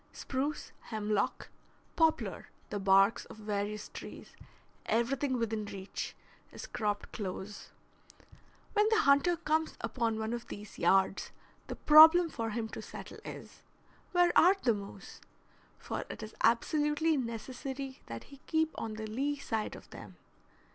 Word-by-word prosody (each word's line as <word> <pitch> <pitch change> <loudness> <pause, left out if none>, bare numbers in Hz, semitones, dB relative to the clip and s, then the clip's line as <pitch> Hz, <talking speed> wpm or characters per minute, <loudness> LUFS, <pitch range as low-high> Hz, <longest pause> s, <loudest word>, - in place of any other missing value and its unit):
Spruce, 280 +3 -3 0.2
hemlock, 215 -2 -1 0.5
poplar, 320 -1 +1 0.2
the 205 - -2
barks 195 +2 +4
of - - -12
various 210 0 -3
trees, - - -10 0.5
everything 255 +3 +1
within 220 -2 -1
reach, 195 -1 -6 0.4
is - - -8
cropped 210 -4 -2
close. 200 0 -6 1.0
When 425 0 +4
the 445 -1 +4
hunter 280 +2 +4
comes 315 +1 0
upon 230 0 -1
one 220 +1 -2
of 240 -1 -5
these 205 0 -9
yards 195 0 +3 0.4
the - - -5
problem 320 +3 +8
for 230 -6 -3
him 225 +1 -2
to - - -7
settle - - -9
is, - - -9 0.5
Where 355 -1 +3
are 365 +4 +7
the 235 - +4
moose? 200 -1 -9 0.6
for - - -4
it - - -7
is 215 - -8
absolutely 295 +6 +2
necessary 260 +2 -5
that 115 0 -7
he 280 - -14
keep 320 -1 +1
on 220 -1 -4
the 220 0 -5
lee 275 +7 -1
side 225 -5 -3
of - - -13
them. - - -11
235 Hz, 140 wpm, -32 LUFS, 210-295 Hz, 1.0 s, problem